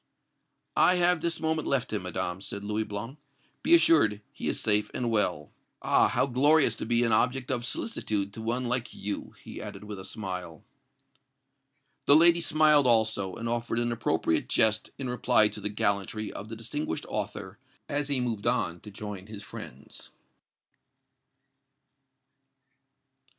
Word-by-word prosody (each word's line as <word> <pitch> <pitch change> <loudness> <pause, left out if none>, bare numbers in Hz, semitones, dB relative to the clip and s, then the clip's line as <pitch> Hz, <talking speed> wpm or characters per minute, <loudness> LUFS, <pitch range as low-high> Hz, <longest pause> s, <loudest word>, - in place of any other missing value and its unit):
"I 180 - +5
have 175 -2 +2
this 170 0 -1
moment 160 -1 -1
left 130 -4 0
him, 105 - -1
Madame," 90 0 -3
said 100 0 -6
Louis 105 +1 -2
Blanc. 110 +8 -6 0.4
"Be 335 - +6
assured, 110 - +4
he - - -5
is - - 0
safe 105 -1 +3
and 120 -2 -1
well. 90 -9 0 0.3
Ah! - - +4
how - - +1
glorious 140 0 +3
to - - -5
be 120 +1 +2
an 115 - +1
object 125 +4 +1
of 120 -2 -1
solicitude 105 - -2
to 110 - -7
one 120 +3 -2
like 120 0 -2
you!" 100 0 -5
he - - -8
added, - - -8
with 105 -2 -7
a - - -8
smile. 90 -6 -6 1.4
The 140 - +7
lady 170 +2 +6
smiled 155 -4 +4
also, 110 -5 +2
and 115 - -5
offered 120 0 -2
an 120 0 0
appropriate 80 -8 0
jest 110 -1 +3
in 135 - -4
reply 115 -3 +3
to 105 0 -8
the 105 - -2
gallantry 105 +1 -1
of 105 - -8
the 115 - -6
distinguished 115 - -4
author, - - -5 0.3
as 145 0 0
he 140 -3 +3
moved 115 -4 -2
on 90 -8 0
to 105 - -11
join 100 -1 -7
his 105 -1 -8
friends. - - -9
115 Hz, 155 wpm, -28 LUFS, 100-130 Hz, 1.4 s, The